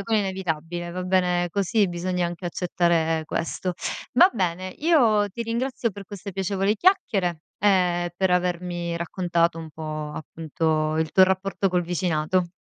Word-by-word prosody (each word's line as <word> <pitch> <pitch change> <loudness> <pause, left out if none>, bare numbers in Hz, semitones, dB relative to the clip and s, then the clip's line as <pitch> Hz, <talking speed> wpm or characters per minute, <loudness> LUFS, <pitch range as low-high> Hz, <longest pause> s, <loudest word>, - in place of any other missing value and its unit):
vabbè - - -3
quello 225 +2 +1
è - - +3
inevitabile. 175 -3 -3
Va 180 +1 -4
bene 180 -1 +1
così, 200 +2 +1
bisogna 175 0 -1
anche 175 +1 -5
accettare 170 -2 +1
questo. 175 +3 -3 0.4
Va 360 +9 +7
bene, 185 -3 -1
io 235 -11 +4
ti 220 +4 -5
ringrazio 235 +1 -1
per 200 0 -10
queste 200 0 -8
piacevoli 195 +2 0
chiacchiere 195 - +2 0.2
e 180 -3 +2
per 190 0 +1
avermi 175 -1 -1
raccontato 170 -1 0
un 160 -1 -8
po', 155 -1 -5
appunto, 155 0 -1
il 160 -1 0
tuo 190 - +7
rapporto 190 +1 0
col 180 -1 +1
vicinato. 175 0 0
180 Hz, 150 wpm, -24 LUFS, 170-195 Hz, 0.4 s, Va